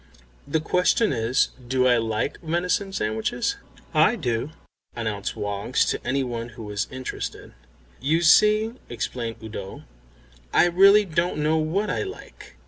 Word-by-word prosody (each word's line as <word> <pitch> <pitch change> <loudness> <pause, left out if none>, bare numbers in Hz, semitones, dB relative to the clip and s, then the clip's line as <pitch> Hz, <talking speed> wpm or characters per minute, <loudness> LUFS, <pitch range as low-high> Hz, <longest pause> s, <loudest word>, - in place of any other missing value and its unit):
"The 160 +3 +1
question 180 +5 +2
is, 115 +1 +1 0.2
Do 130 0 +2
I 125 -1 +5
like 110 +4 -2
venison 180 +4 -1
sandwiches?" 110 - -1 0.4
"I - - +4
do," 120 +3 -2 0.5
announced 110 -4 -3
Woggs 105 +4 0
to - - -4
any 135 +1 0
one 120 -2 -4
who 115 0 -10
was 105 0 -3
interested. 130 0 -6 0.5
"You 155 +6 +1
see," 215 +6 +5 0.2
explained 115 +1 -4
Udo, 100 -3 -7 0.7
"I - - +6
really 195 +4 +6
don't 170 -1 -1
know 155 +1 +2
what 175 +7 0
I - - -1
like." 400 +1 -9
130 Hz, 135 wpm, -24 LUFS, 115-175 Hz, 0.7 s, I